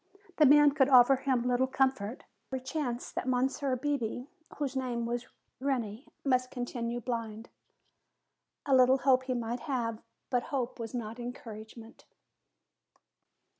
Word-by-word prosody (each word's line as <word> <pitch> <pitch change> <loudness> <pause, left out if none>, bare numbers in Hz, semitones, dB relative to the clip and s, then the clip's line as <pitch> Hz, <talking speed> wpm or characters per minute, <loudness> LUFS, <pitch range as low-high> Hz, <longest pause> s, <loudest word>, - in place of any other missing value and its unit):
The 300 - +7
man 295 +1 +7
could 275 -2 +3
offer 260 0 +7
him 260 -2 0
little 250 +1 +2
comfort. 260 -4 0 0.3
There 265 - -2
was - - -8
every - - -24
chance 260 -5 -3
that - - -4
Monsieur 260 +1 0
Bebé, 250 -3 -2 0.3
whose 280 -2 -2
name 245 -3 -2
was 240 +1 -3 0.3
Reney, 250 -3 -2 0.2
must 255 -2 +2
continue 240 -1 -3
blind. 230 -2 -5 1.2
A 275 -3 +4
little 255 +1 +6
hope 260 -1 +3
he 255 -1 -1
might 235 0 -3
have, 235 -6 -3 0.3
but 245 -1 +2
hope 260 -5 -3
was 230 +1 -5
not 230 0 -5
encouragement. 230 -2 -9
250 Hz, 140 wpm, -30 LUFS, 235-265 Hz, 1.2 s, The